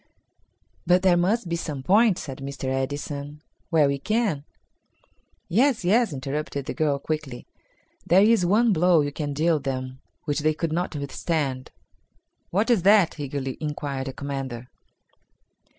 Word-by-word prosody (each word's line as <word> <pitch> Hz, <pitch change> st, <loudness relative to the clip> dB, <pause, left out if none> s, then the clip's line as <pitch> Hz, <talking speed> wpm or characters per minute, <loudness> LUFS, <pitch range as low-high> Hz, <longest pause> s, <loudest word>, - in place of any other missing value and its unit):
"But 180 Hz, +1 st, +4 dB
there 185 Hz, -2 st, +5 dB
must 190 Hz, +4 st, +1 dB
be 170 Hz, -, -1 dB
some 150 Hz, -5 st, -5 dB
point," 205 Hz, -, +4 dB
said 135 Hz, -4 st, -7 dB
Mr. 140 Hz, 0 st, -7 dB
Edison, 145 Hz, +2 st, -4 dB, 0.3 s
"where 155 Hz, -3 st, +4 dB
we 140 Hz, 0 st, -1 dB
can." 215 Hz, -, -1 dB, 1.0 s
"Yes, 235 Hz, 0 st, +2 dB
yes," 225 Hz, +4 st, +3 dB
interrupted 140 Hz, 0 st, -4 dB
the -, -, -4 dB
girl 150 Hz, -4 st, +1 dB
quickly, 140 Hz, -3 st, -5 dB, 0.6 s
"there 185 Hz, +3 st, +6 dB
is 220 Hz, -3 st, +4 dB
one 215 Hz, +5 st, +3 dB
blow 175 Hz, -1 st, +4 dB
you 145 Hz, 0 st, -2 dB
can 145 Hz, 0 st, -4 dB
deal 155 Hz, +2 st, +1 dB
them 130 Hz, -1 st, -4 dB, 0.2 s
which 145 Hz, -1 st, -1 dB
they 155 Hz, +1 st, +1 dB
could 160 Hz, 0 st, -2 dB
not 175 Hz, -1 st, -2 dB
withstand." 140 Hz, -2 st, -2 dB, 0.8 s
"What 210 Hz, +7 st, +1 dB
is 225 Hz, -6 st, +3 dB
that?" 195 Hz, -4 st, +4 dB
eagerly 135 Hz, -2 st, -4 dB
inquired 145 Hz, -3 st, -4 dB
the 135 Hz, -, -5 dB
commander. 135 Hz, -4 st, -5 dB
150 Hz, 145 wpm, -25 LUFS, 140-180 Hz, 1.0 s, there